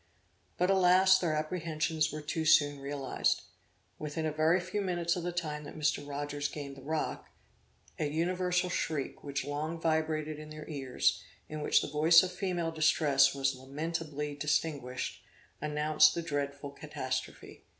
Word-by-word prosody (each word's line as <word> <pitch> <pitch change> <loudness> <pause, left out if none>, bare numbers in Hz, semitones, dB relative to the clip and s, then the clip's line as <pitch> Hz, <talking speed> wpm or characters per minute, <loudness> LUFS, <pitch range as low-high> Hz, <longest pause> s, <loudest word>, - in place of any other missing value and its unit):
But, 180 +2 +2
alas, 190 0 +6
their 165 -4 0
apprehensions 155 -1 -1
were 155 - -5
too 160 +2 -2
soon 145 -2 +4
realized! 140 -1 -1 0.6
Within 155 +1 -3
a 155 - 0
very 155 +4 +3
few 185 +3 -3
minutes 175 -2 0
of 175 - -3
the 175 +1 -2
time 155 -4 -3
that - - -9
Mr. 145 -1 0
Rogers 145 0 -3
gained 140 -1 -7
the 135 - -12
rock, 155 +3 -3 0.7
an 150 -2 -1
universal 180 +2 0
shriek, 155 -6 -2
which 140 -2 -3
long 155 +3 -3
vibrated 155 -1 0
in 155 0 -9
their 155 0 -9
ears, 135 -5 0 0.3
in 155 0 -6
which - - +3
the - - -3
voice 160 +4 +6
of 185 - -3
female 180 -3 -2
distress 155 -3 +4
was 135 0 +1
lamentably 150 +2 -4
distinguished, 145 -3 -2 0.4
announced 150 +1 +4
the 170 - -2
dreadful 140 -2 -3
catastrophe. 130 -3 -5
155 Hz, 150 wpm, -31 LUFS, 145-165 Hz, 0.7 s, alas